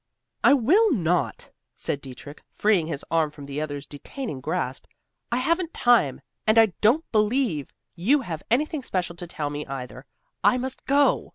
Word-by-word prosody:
"I -, -, +7 dB
will 365 Hz, -, +4 dB
not," 170 Hz, -, 0 dB, 0.2 s
said 140 Hz, -, -3 dB
Dietrich, 135 Hz, +3 st, -11 dB
freeing 200 Hz, -7 st, +2 dB
his 150 Hz, -4 st, -5 dB
arm 165 Hz, -2 st, +2 dB
from 145 Hz, -1 st, -11 dB
the 140 Hz, +2 st, -4 dB
other's 145 Hz, -2 st, -4 dB
detaining 145 Hz, -, -7 dB
grasp. 130 Hz, +1 st, -2 dB, 0.5 s
"I 240 Hz, -, +1 dB
haven't 335 Hz, +6 st, 0 dB
time, 235 Hz, -, +3 dB, 0.3 s
and 215 Hz, +1 st, +4 dB
I 220 Hz, -4 st, +6 dB
don't 250 Hz, +10 st, +4 dB
believe 215 Hz, -, +1 dB, 0.2 s
you 260 Hz, +12 st, +2 dB
have 165 Hz, -9 st, -5 dB
anything 300 Hz, +5 st, +1 dB
special 180 Hz, -7 st, -3 dB
to 175 Hz, -, -7 dB
tell 150 Hz, -3 st, -4 dB
me, 145 Hz, 0 st, -4 dB
either. 130 Hz, -1 st, -7 dB, 0.4 s
I 205 Hz, +5 st, +5 dB
must 260 Hz, +1 st, -5 dB
go." 280 Hz, +1 st, +3 dB
180 Hz, 165 wpm, -25 LUFS, -, 0.5 s, I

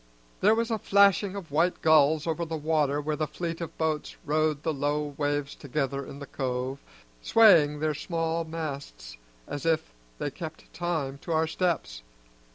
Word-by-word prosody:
There 210 Hz, +3 st, +5 dB
was 230 Hz, +1 st, -1 dB
a 220 Hz, -, 0 dB
flashing 200 Hz, 0 st, +4 dB
of 185 Hz, -7 st, -7 dB
white 165 Hz, +5 st, +1 dB
gulls 155 Hz, -1 st, +5 dB
over 165 Hz, 0 st, -1 dB
the 165 Hz, -1 st, -3 dB
water 150 Hz, -2 st, +1 dB
where 150 Hz, +1 st, -2 dB
the 155 Hz, 0 st, -1 dB
fleet 170 Hz, 0 st, -4 dB
of 170 Hz, -, -6 dB
boats 155 Hz, -2 st, -1 dB
rode 155 Hz, 0 st, +1 dB
the 160 Hz, -, 0 dB
low 145 Hz, +1 st, -1 dB
waves 145 Hz, -1 st, -1 dB
together 140 Hz, 0 st, -3 dB
in -, -, -9 dB
the 140 Hz, -, -7 dB
cove, 130 Hz, 0 st, -3 dB, 0.4 s
swaying 160 Hz, -, +6 dB
their 155 Hz, -1 st, +1 dB
small 165 Hz, +2 st, -2 dB
masts 145 Hz, -, -6 dB, 0.3 s
as 145 Hz, -, -5 dB
if 160 Hz, -, 0 dB, 0.2 s
they 145 Hz, -, -3 dB
kept 160 Hz, +1 st, -9 dB
time 155 Hz, -6 st, -2 dB
to 165 Hz, -, -4 dB
our 160 Hz, 0 st, +3 dB
steps. 160 Hz, -, -1 dB
155 Hz, 165 wpm, -28 LUFS, 145-165 Hz, 0.4 s, swaying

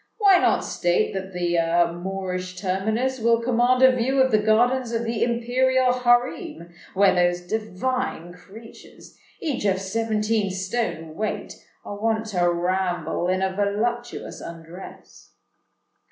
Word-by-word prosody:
Why 400 Hz, -4 st, +6 dB
not -, -, +2 dB
state 175 Hz, 0 st, 0 dB
that 190 Hz, 0 st, -5 dB
the 170 Hz, -1 st, +1 dB
Moorish 185 Hz, 0 st, -5 dB
terminus 220 Hz, +7 st, -1 dB
will 230 Hz, 0 st, +3 dB
command 245 Hz, +2 st, +2 dB
a 260 Hz, -1 st, +7 dB
view 260 Hz, +3 st, 0 dB
of 260 Hz, 0 st, +4 dB
the 215 Hz, -, +4 dB
gardens 240 Hz, +3 st, +2 dB
of 230 Hz, 0 st, -1 dB
the 230 Hz, -1 st, -1 dB
imperial 250 Hz, +2 st, +2 dB
harem, 245 Hz, -, 0 dB, 0.2 s
where 195 Hz, 0 st, +5 dB
those 175 Hz, -1 st, +1 dB
divine 215 Hz, -1 st, -3 dB
creatures—each 225 Hz, -, -9 dB
of 190 Hz, -2 st, +2 dB
seventeen 215 Hz, +1 st, -1 dB
stone 190 Hz, -4 st, -3 dB
weight—are 205 Hz, +1 st, -6 dB
wont 220 Hz, 0 st, 0 dB
to 175 Hz, -2 st, +2 dB
ramble 180 Hz, 0 st, -1 dB
in 185 Hz, +1 st, 0 dB
a 190 Hz, 0 st, -1 dB
voluptuous 215 Hz, +4 st, -2 dB
undress?" 170 Hz, +2 st, -11 dB
210 Hz, 125 wpm, -23 LUFS, 180-240 Hz, 0.2 s, a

